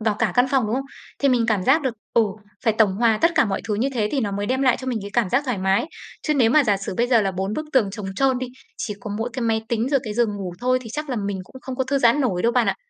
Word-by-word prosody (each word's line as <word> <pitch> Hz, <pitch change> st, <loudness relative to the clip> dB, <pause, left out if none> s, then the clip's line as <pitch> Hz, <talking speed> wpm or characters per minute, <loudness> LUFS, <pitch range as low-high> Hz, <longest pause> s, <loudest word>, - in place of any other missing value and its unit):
vào 220 Hz, -1 st, +1 dB
cả -, -, +1 dB
căn 245 Hz, 0 st, +4 dB
phòng, 265 Hz, -5 st, +2 dB
đúng 215 Hz, -, -1 dB
không? 270 Hz, -, -2 dB, 0.3 s
Thì 280 Hz, -, +2 dB
mình 245 Hz, -3 st, +3 dB
cảm 210 Hz, -5 st, +1 dB
giác 285 Hz, +5 st, +4 dB
được, 260 Hz, -4 st, -1 dB, 0.2 s
ừ, 230 Hz, -, +6 dB, 0.4 s
phải 225 Hz, -, +4 dB
tổng 215 Hz, -2 st, +3 dB
hòa 225 Hz, -1 st, +3 dB
tất 330 Hz, -, +5 dB
cả 310 Hz, -, +4 dB
mọi 195 Hz, -3 st, -2 dB
thứ 210 Hz, -, +1 dB
như 240 Hz, +6 st, 0 dB
thế 215 Hz, -4 st, 0 dB
thì 275 Hz, -, +1 dB
nó 205 Hz, -4 st, -2 dB
mới 200 Hz, +1 st, -2 dB
đem 260 Hz, +4 st, 0 dB
lại 255 Hz, -2 st, +4 dB
cho 260 Hz, -, -8 dB
mình 250 Hz, -3 st, -1 dB
cái 200 Hz, -, -7 dB
cảm 235 Hz, -5 st, +1 dB
giác 270 Hz, +3 st, +2 dB
thoải 250 Hz, -7 st, -2 dB
mái. 190 Hz, +6 st, +1 dB, 0.4 s
Chứ 305 Hz, -, 0 dB
nếu 240 Hz, -5 st, +4 dB
mà 300 Hz, +3 st, +5 dB
giả 205 Hz, -4 st, +2 dB
sử 195 Hz, -1 st, -5 dB
bây 240 Hz, -, +2 dB
giờ 240 Hz, -2 st, +4 dB
là 195 Hz, -2 st, 0 dB
4 190 Hz, +2 st, -3 dB
bức 310 Hz, +7 st, -3 dB
tường 230 Hz, -7 st, +3 dB
trống 200 Hz, 0 st, -6 dB
trơn 265 Hz, -2 st, +2 dB
đi, 255 Hz, -, -3 dB, 0.3 s
chỉ 210 Hz, -, -4 dB
có 210 Hz, -, -6 dB
mỗi 230 Hz, +2 st, -2 dB
cái 255 Hz, -, -3 dB
máy 225 Hz, -1 st, +1 dB
tính 235 Hz, 0 st, 0 dB
rồi 275 Hz, -1 st, +2 dB
cái 215 Hz, -2 st, -4 dB
giường 220 Hz, -3 st, +1 dB
ngủ 190 Hz, -3 st, -5 dB
thôi 255 Hz, +1 st, +2 dB
thì 230 Hz, -, -9 dB
chắc 300 Hz, +2 st, -4 dB
là 250 Hz, -, -1 dB
mình 200 Hz, -2 st, -2 dB
cũng 260 Hz, +7 st, -14 dB
không 260 Hz, -1 st, -6 dB
có 260 Hz, -, 0 dB
thư 275 Hz, +2 st, 0 dB
giãn 240 Hz, +2 st, +4 dB
nổi 195 Hz, -10 st, 0 dB
đâu 235 Hz, -, +2 dB
bạn 245 Hz, -2 st, +2 dB
ạ. -, -, +1 dB
235 Hz, 330 wpm, -22 LUFS, 210-260 Hz, 0.4 s, ừ